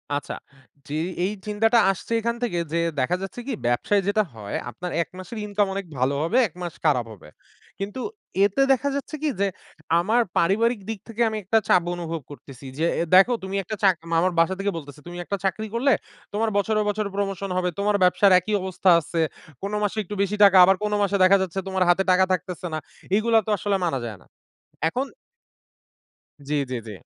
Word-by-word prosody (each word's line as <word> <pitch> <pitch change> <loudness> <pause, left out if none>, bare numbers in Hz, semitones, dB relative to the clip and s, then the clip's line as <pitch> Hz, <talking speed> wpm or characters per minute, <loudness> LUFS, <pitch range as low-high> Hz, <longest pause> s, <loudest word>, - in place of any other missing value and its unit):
আচ্ছা। 145 - -4 0.5
জি, 145 - -4 0.3
এই 200 - -1 0.2
চিন্তাটা 225 +3 +3
আসছে 195 - -9
এখান 235 +1 -1
থেকে 200 -8 -1 0.2
যে - - +1 0.2
দেখা 150 +8 +1
যাচ্ছে 195 +5 -6
কি 265 - -2
ব্যবসায় 120 - +2
যেটা 215 +1 +3
হয় 105 -2 -6
আপনার 175 +10 -6
১ - - -4
মাসের 185 +5 -8
ইনকাম 205 -1 +1
অনেক 195 -1 -4
ভালো 130 +3 +1
হবে 175 +10 +1
১ 165 - -22
মাস 175 -2 -4
খারাপ 125 -6 +3
হবে। 80 -6 -15 0.5
কিন্তু 205 +6 -4 0.4
এতে 205 +7 +1
দেখা 275 +2 +2
যাচ্ছে 280 +2 -4
কি 305 - +2
যে 200 - +3 0.5
আমার 220 +7 +2 0.2
পারিবারিক 220 +6 +2
দিক 220 -3 -3
থেকে 230 +1 -5
আমি 220 - -4
একটা 225 +4 +2
চাপ 180 -2 +4
অনুভব 165 -2 -4
করতেছি 135 -2 -12
যে 165 - +2 0.2
এ - - +2
দেখো 215 +6 +7
তুমি 190 +1 -4
একটা 215 +5 -5
চাক 190 -2 +5 0.2
আমার 185 +2 +2
বাসা 165 +3 +3
থেকে 200 0 0
বলতেছে, 145 -2 -9
"তুমি 175 0 -7
একটা 200 - -2
চাকরি 215 +4 -1
করলে 270 +4 +3 0.4
তোমার 220 +1 +1
বছরে, 215 +1 +1
বছরে 205 0 -1
প্রমোশন 195 -1 -2
হবে 180 0 +1
তোমার 205 0 +2
ব্যবসার 190 +2 +5
একই 210 +4 -4
অবস্থা 190 0 0
আছে। 165 +1 -2 0.4
কোন 200 +1 -4
মাসে 205 +1 -1
একটু 205 +3 -7
বেশি 200 +1 0
টাকা 195 -1 +7
আবার 190 +1 +6
কোন 210 - -1
মাসে 200 0 +1
দেখা 195 +2 +6
যাচ্ছে 190 +1 -2
তোমার 190 -1 +1
হাতে 190 +2 +4
টাকা 185 +1 +5
থাকতেছে 180 +1 -4
না। - - 0 0.4
এইগুলা 225 +1 +3
তো - - -5
আসলে 200 +1 0
মানা 135 -6 -1
যায় 110 -3 -6
না।" - - -20 0.6
এখন 260 +9 -2 1.4
জি, 150 - -2 0.2
জি, - - -1
জি। - - -6
195 Hz, 195 wpm, -24 LUFS, 170-215 Hz, 1.4 s, দেখো